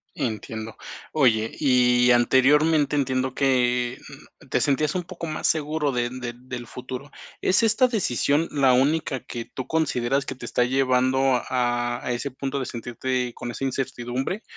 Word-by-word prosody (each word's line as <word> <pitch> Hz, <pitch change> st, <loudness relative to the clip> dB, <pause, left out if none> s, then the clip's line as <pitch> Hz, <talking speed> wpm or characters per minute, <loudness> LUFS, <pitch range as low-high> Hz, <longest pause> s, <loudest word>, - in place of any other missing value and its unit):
Entiendo. 110 Hz, -1 st, -4 dB, 0.4 s
Oye, 115 Hz, -7 st, +3 dB
y 125 Hz, -3 st, +4 dB
anteriormente 145 Hz, +5 st, +4 dB
entiendo 130 Hz, -2 st, 0 dB
que, 125 Hz, -2 st, +1 dB, 0.5 s
mm, -, -, -18 dB
te -, -, +1 dB
sentías 150 Hz, +1 st, +1 dB
un 180 Hz, -, -1 dB
poco 170 Hz, -1 st, -7 dB
más 155 Hz, -1 st, -2 dB
seguro 150 Hz, -1 st, 0 dB
de 120 Hz, -1 st, -1 dB
de 125 Hz, -2 st, -5 dB
del 125 Hz, -1 st, -8 dB
futuro. 130 Hz, +2 st, -7 dB, 0.3 s
¿Es 190 Hz, +5 st, +3 dB
esta 225 Hz, +4 st, +4 dB
decisión 165 Hz, -, +1 dB
la 135 Hz, -3 st, +4 dB
única 135 Hz, 0 st, +1 dB
que 115 Hz, -2 st, -6 dB
tú 125 Hz, +1 st, -7 dB
consideras 140 Hz, -4 st, 0 dB
que 135 Hz, -, -4 dB
te 120 Hz, -, -9 dB
está 120 Hz, +1 st, +1 dB
llevando 130 Hz, 0 st, +2 dB
a 120 Hz, -1 st, 0 dB
a 125 Hz, -, -1 dB
ese 120 Hz, +4 st, -2 dB
punto 135 Hz, +1 st, -4 dB
de 130 Hz, -, -3 dB
sentirte 120 Hz, +1 st, -3 dB
con 120 Hz, -, -7 dB
esa 130 Hz, -, -6 dB
incertidumbre, 130 Hz, -, -3 dB
130 Hz, 155 wpm, -24 LUFS, 120-145 Hz, 0.5 s, y